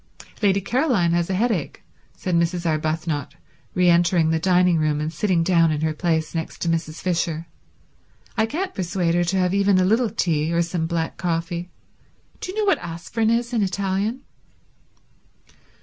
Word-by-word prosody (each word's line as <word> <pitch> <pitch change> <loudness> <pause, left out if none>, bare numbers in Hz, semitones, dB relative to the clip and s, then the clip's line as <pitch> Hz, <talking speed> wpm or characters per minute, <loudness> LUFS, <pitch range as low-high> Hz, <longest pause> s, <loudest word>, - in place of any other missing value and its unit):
"Lady 200 -2 +3
Caroline 235 - +1
has 170 0 +1
a 190 - 0
headache," 210 - -1 0.3
said 185 - -3
Mrs. 170 +1 +1
Arbuthnot, 155 -2 -1 0.4
re 180 0 +3
entering 170 -1 +4
the 160 - +1
dining 180 -1 +3
room 155 -1 +1
and 155 +2 -3
sitting 180 -5 +1
down 165 -2 +4
in 150 -1 -1
her 160 0 0
place 160 -1 -1
next 165 -1 -4
to - - -2
Mrs. 160 -1 -2
Fisher. 165 -2 -1 0.9
"I 220 -1 +2
can't 370 +10 -3
persuade 175 -2 -1
her 175 0 +2
to 190 +3 0
have 180 0 +1
even 200 -1 +3
a 185 - +3
little 225 +4 +2
tea, 165 -7 0
or 170 0 +2
some 165 -1 -2
black 165 -1 -2
coffee. 170 0 -2 0.7
Do 365 - -5
you 400 - -9
know 430 - +1
what 390 - +3
aspirin 175 +6 -2
is 235 +1 0
in 230 - +2
Italian?" 200 +5 -1
175 Hz, 170 wpm, -23 LUFS, 165-195 Hz, 0.9 s, entering